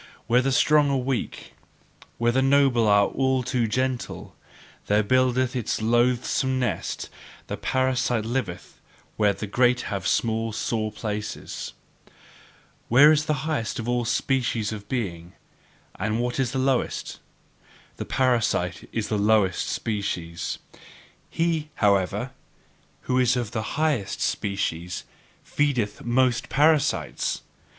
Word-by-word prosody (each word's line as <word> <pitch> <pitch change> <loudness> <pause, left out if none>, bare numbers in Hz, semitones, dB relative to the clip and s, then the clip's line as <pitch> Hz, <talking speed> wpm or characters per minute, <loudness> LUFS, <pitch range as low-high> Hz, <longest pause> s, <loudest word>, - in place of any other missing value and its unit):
Where 125 +2 +3
the 135 +1 0
strong 150 +2 +4
are 140 - +1
weak, 130 -1 -3 0.6
where 120 0 +2
the 130 +2 +2
noble 135 -4 +4
are 100 -1 +5
all 130 +1 0
too 125 -2 0
gentle 130 +2 -3 0.5
there 105 +1 +3
buildeth 130 +2 +2
it - - +1
its 115 - -2
loathsome 120 +3 +1
nest; 125 - -2 0.4
the - - -4
parasite 125 -3 0
liveth 115 -7 -4 0.3
where 105 -2 +3
the 105 - -5
great 125 +4 +2
have 100 -2 -3
small 115 -1 0
sore 110 0 -2
places. 105 -1 -5 1.1
What 125 +5 +6
is 150 -1 +2
the 150 -2 -1
highest 150 -8 -2
of 115 - -4
all 120 0 +1
species 120 -2 0
of 105 -1 -8
being, 90 -8 -4 0.7
and 110 +1 -1
what 120 +1 -2
is 130 -3 +1
the 135 - -3
lowest? 130 -1 -1 0.8
The - - -4
parasite 115 -9 0
is 110 -2 -2
the 105 - 0
lowest 105 -3 +2
species; 85 -6 -3 0.7
he, 165 -2 -1
however, 100 -3 +1 0.7
who 130 0 0
is 125 0 +3
of 120 -3 -3
the 110 +2 -4
highest 140 -11 0
species 90 -4 -2 0.4
feedeth 125 -8 -1
most 125 0 +1
parasites. 150 +1 +1
120 Hz, 125 wpm, -25 LUFS, 105-130 Hz, 1.1 s, What